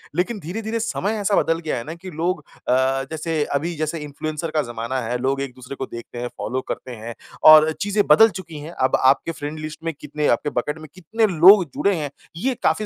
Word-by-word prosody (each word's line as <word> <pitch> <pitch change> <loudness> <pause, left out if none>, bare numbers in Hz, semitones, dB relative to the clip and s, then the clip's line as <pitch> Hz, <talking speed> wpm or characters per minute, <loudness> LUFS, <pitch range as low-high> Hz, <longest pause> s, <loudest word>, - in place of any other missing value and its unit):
लेकिन 205 +5 -1
धीरे-धीरे 220 +7 -4
समय 220 -1 -1
ऐसा 200 0 +2
बदल 165 0 0
गया 160 -5 -3
है 115 - -4
ना 160 +5 -7
कि 185 +2 -10
लोग 165 0 -2 0.2
अ, 130 +1 +2
जैसे 160 -1 -1
अभी 165 +4 -1
जैसे 155 +1 -2
इंफ्लुएंसर 155 +2 -5
का 155 - +1
ज़माना 115 +3 -3
है। 120 +1 -2
लोग 135 +2 -1
एक-दूसरे 130 0 -7
को 130 - -4
देखते 120 0 -9
हैं, 120 - -3
फ़ॉलो 125 +1 -4
करते 130 - -5
हैं 115 +1 -8 0.4
और 155 0 +8
चीज़ें 205 0 +1
बदल 220 +10 +7
चुकी 165 -4 -9
हैं। 155 +3 -8
अब 130 -5 +1
आपके 135 +5 +4
फ्रेंड 155 0 -6
लिस्ट 155 +1 -7
में 165 -1 -2
कितने, 150 0 -2
आपके 120 +5 +1
बकेट 150 +4 -2
में 155 - -10
कितने 215 +5 0
लोग 185 +2 +8
जुड़े 200 -1 +2
हैं, 150 -4 -3 0.3
ये 260 +8 0
काफ़ी 215 - +2
155 Hz, 215 wpm, -22 LUFS, 135-180 Hz, 0.4 s, और